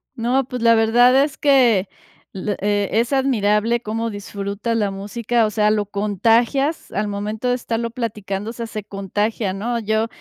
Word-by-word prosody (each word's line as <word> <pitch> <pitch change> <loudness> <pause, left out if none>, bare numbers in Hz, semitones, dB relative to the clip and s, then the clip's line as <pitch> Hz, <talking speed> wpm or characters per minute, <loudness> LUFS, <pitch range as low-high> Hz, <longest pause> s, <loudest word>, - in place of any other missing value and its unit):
No, 245 +3 0
pues, 250 -2 -5
la 230 0 +5
verdad 245 +4 +5
es 290 -1 -4
que, 245 -9 +4 0.5
eh, 205 +1 -1
es 230 +5 +1
admirable 235 -3 +1
cómo 225 +1 -3
disfrutas 205 +2 -4
la 210 -2 +1
música, 220 +4 -1
o - - 0
sea, 210 0 +2
lo 210 -1 0
contagias 225 - +1
al 210 +1 -1
momento 210 +4 -3
de 245 - +2
estarlo 235 -1 -3
platicando, 210 -3 -4
o - - -6
sea, 235 -1 -5
se 215 -2 -6
contagia, 205 +1 -2
¿no? 235 +5 -2
Yo, 220 +1 0
220 Hz, 165 wpm, -20 LUFS, 205-235 Hz, 0.5 s, la